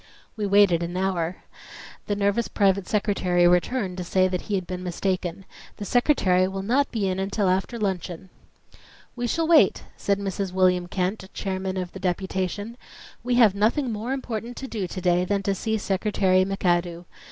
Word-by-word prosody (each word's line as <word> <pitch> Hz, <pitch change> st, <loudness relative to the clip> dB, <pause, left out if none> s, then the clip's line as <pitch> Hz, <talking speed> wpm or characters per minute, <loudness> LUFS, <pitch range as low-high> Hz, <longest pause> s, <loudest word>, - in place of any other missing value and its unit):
We 210 Hz, -2 st, -2 dB
waited 200 Hz, -4 st, +4 dB
an 175 Hz, +1 st, -3 dB
hour. 185 Hz, -2 st, -2 dB, 0.6 s
The 205 Hz, -, 0 dB
nervous 200 Hz, +3 st, +1 dB
private 195 Hz, -2 st, +1 dB
secretary 185 Hz, -4 st, +2 dB
returned 180 Hz, +2 st, +1 dB
to 180 Hz, -, -3 dB
say 185 Hz, +1 st, +2 dB
that 180 Hz, -1 st, -2 dB
he 205 Hz, -, -3 dB
had 185 Hz, -2 st, -2 dB
been 180 Hz, 0 st, -5 dB
mistaken. 185 Hz, 0 st, -3 dB, 0.3 s
"The 205 Hz, -, -5 dB
Secretary 195 Hz, -8 st, +3 dB
will 190 Hz, 0 st, -4 dB
not 255 Hz, +7 st, +2 dB
be 210 Hz, -4 st, -1 dB
in 185 Hz, 0 st, -1 dB
until 195 Hz, +1 st, 0 dB
after 190 Hz, +6 st, 0 dB
luncheon." 185 Hz, -3 st, -3 dB, 0.8 s
"We 245 Hz, 0 st, -2 dB
shall 325 Hz, +6 st, 0 dB
wait," 335 Hz, -1 st, +5 dB
said 200 Hz, -1 st, 0 dB
Mrs. 195 Hz, -1 st, -3 dB
William 180 Hz, -1 st, +2 dB
Kent, 190 Hz, +2 st, -2 dB
chairman 190 Hz, -1 st, -3 dB
of 180 Hz, -1 st, -3 dB
the 190 Hz, -, -9 dB
deputation. 190 Hz, +4 st, -2 dB, 0.5 s
"We 245 Hz, 0 st, 0 dB
have 225 Hz, -5 st, +6 dB
nothing 230 Hz, +6 st, +1 dB
more 220 Hz, +4 st, -4 dB
important 245 Hz, -3 st, -4 dB
to 270 Hz, -, -6 dB
do 210 Hz, -7 st, -3 dB
to 185 Hz, +1 st, -6 dB
day 180 Hz, 0 st, +2 dB
than 200 Hz, +2 st, -1 dB
to 200 Hz, -, +1 dB
see 220 Hz, +3 st, -1 dB
Secretary 190 Hz, -2 st, +1 dB
McAdoo. 175 Hz, -3 st, -1 dB
195 Hz, 175 wpm, -25 LUFS, 180-210 Hz, 0.8 s, have